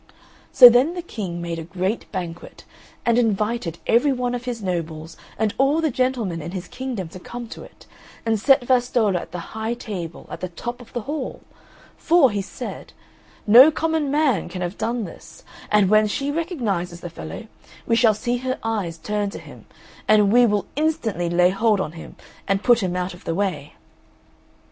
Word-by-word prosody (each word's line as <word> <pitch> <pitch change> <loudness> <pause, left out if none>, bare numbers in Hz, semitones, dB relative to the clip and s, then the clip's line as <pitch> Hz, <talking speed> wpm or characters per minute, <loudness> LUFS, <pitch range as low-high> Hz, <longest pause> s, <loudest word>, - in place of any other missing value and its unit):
So 250 - +11
then 250 +8 +4
the 350 - -5
King 180 - -5
made 170 -1 -4
a - - -5
great 185 +6 -3
banquet, 175 -3 -7 0.4
and 235 0 +3
invited 210 -5 0
every 245 +5 +3
one 250 -1 -1
of 245 0 -4
his 235 -4 -4
nobles 160 -3 -4 0.2
and 215 -2 0
all 275 +4 +3
the 315 -3 +1
gentlemen 235 -9 -1
in 170 +4 -7
his 185 -1 -5
kingdom 250 -8 -5
to 185 - -10
come 240 +6 -7
to - - -9
it, - - -15 0.4
and 225 -1 +1
set 265 +2 +4
Vastolla 245 -6 +2
at 170 - -10
the 175 -1 -8
high 220 +2 -2
table 185 -8 -7
at - - -6
the 185 - -4
top 240 +8 -6
of 245 - -15
the 240 - -2
hall, 285 +3 -5 0.6
for, 325 -7 +4
he 205 -1 -1
said, 195 - -8 0.5
"No 240 +7 +9
common 315 -2 -1
man 280 - +1
can 180 -1 -5
have 175 +2 -4
done 235 0 -2
this, 175 - -11 0.3
and 210 -2 +4
when 215 +2 +4
she 275 +7 -2
recognises 220 - -2
the 175 - -6
fellow 195 - -8 0.4
we 230 - +2
shall 225 -2 +4
see 240 +4 -1
her 255 +1 -3
eyes 205 -7 -2
turn 205 +4 -2
to - - -8
him, - - -13 0.4
and 210 -1 +4
we 245 0 +6
will 205 -2 0
instantly 230 - -1
lay 180 +1 +4
hold 215 +1 +2
on 190 - -2
him 165 0 -11 0.3
and 195 +1 0
put 240 -2 +5
him 180 -2 -2
out 180 0 -2
of 175 - -14
the 165 - -2
way." 180 -7 -2
215 Hz, 190 wpm, -22 LUFS, 180-245 Hz, 0.6 s, So